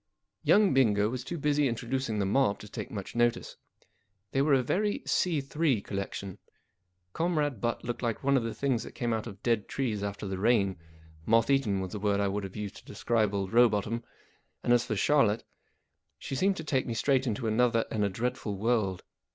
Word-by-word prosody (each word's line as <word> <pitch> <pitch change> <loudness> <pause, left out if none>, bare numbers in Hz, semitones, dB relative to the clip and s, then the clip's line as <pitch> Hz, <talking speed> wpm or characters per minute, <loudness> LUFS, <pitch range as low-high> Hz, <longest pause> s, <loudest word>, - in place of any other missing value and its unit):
Young 205 -5 +4
Bingo 105 -6 +3
was 125 +1 -4
too 170 +6 -5
busy 145 -1 +2
introducing 120 -1 -2
the 100 - +1
mob 105 +1 +2
to 105 - -10
take - - -6
much 100 -1 -7
notice. 120 0 +1 0.8
They 135 - +1
were 140 0 +4
a 130 - +2
very 205 - 0
C3 150 - 0
collection. 100 0 -5 0.7
Comrade 150 - 0
Butt 120 0 -1
looked 120 0 -4
like 115 0 -2
one 140 0 +3
of 130 - +3
the 115 -1 -4
things 130 -5 0
that - - -9
come 120 -2 -1
out 110 +1 -2
of 100 -3 -10
dead 115 -4 +1
trees 115 -7 -2
after 100 0 -4
the 95 -1 -4
rain; 100 -4 +2 0.5
moth 115 +4 +4
eaten 110 -9 +2
was 95 -1 -5
the 105 - -5
word 100 0 +1
I 100 -1 0
should 100 -1 -2
have 95 - -9
used 105 -1 -5
to - - -15
describe 110 0 0
old 95 -1 -2
Rowbotham; 115 -1 +3 0.6
and 120 - +3
as 120 -1 +4
for 110 - -2
Charlotte, 115 -2 +3 0.7
she - - -7
seemed 195 +8 +1
to 160 - -5
take 135 -4 0
me 115 - -3
straight 135 +2 +2
into 115 +1 -2
another 115 +1 +2
and 105 -2 0
a 100 - +2
dreadful 105 -1 -3
world. 105 -4 0
115 Hz, 200 wpm, -29 LUFS, 105-135 Hz, 0.8 s, Young